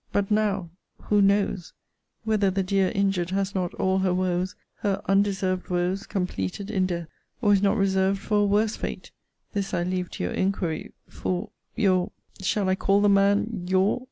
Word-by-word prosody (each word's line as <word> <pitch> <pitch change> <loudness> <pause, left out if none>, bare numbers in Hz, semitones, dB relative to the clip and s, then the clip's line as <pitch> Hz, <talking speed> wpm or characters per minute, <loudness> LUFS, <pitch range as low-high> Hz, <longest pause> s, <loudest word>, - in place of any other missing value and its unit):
But 200 0 0
now 205 -5 +1 0.3
who 205 -1 +2
knows, 200 -2 +1 0.5
whether 215 -3 +2
the 190 +1 0
dear 190 0 +2
injured 195 -3 +1
has 195 +1 -1
not 180 -2 -1
all 190 0 +1
her 185 -1 +1
woes, 180 0 -1 0.2
her 200 -2 -1
undeserved 195 -2 +1
woes, 180 +3 -1
completed 180 - -3
in 190 -3 +1
death; 170 -2 -3 0.3
or 205 -4 +4
is 195 - +3
not 205 +2 +2
reserved 195 -1 +2
for 205 +1 0
a 205 - +4
worse 210 +2 +2
fate! - - -6 0.4
This 200 -2 -2
I 175 - 0
leave 180 0 -2
to - - -4
your 90 - -2
inquiry 185 -4 -1
for 185 +4 -3 0.2
your 185 -4 +2 0.3
[shall 195 +1 0
I 185 - +3
call 195 +1 +2
the 205 - +4
man 200 0 +2
your? 190 +5 +2
195 Hz, 175 wpm, -25 LUFS, 185-200 Hz, 0.5 s, or